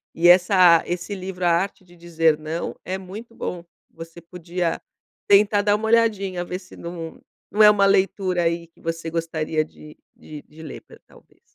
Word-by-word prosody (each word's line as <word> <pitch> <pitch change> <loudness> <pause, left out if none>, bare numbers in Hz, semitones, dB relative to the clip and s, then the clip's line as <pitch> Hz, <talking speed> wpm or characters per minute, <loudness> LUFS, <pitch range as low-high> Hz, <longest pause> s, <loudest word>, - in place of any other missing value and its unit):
E 170 +1 +3
essa 180 -2 +6
esse 175 +3 -4
livro 185 -1 -5
A - - +4
Arte 185 +3 -1
de 175 0 -19
Dizer 165 -2 +1
Não 155 +2 -5
é 185 +1 -3
muito 210 +5 -11
bom 175 -1 -5 0.3
você 165 +1 -11
podia 170 0 -4 0.5
tentar 205 0 +4
dar 205 0 +3
uma 220 +1 -3
"olhadinha" 205 -6 +1
ver 180 - -5
se 185 - -16
não 170 -1 -8 0.4
é 210 - +9
uma 200 -1 +3
leitura 190 -2 +1
aí 170 0 -1
que 165 - -27
você 165 0 -4
gostaria 160 -1 -2
de 150 0 -15 0.2
de 155 +1 -12
ler 155 - -9
ta - - -18
talvez. - - -22
175 Hz, 170 wpm, -22 LUFS, 165-190 Hz, 0.5 s, é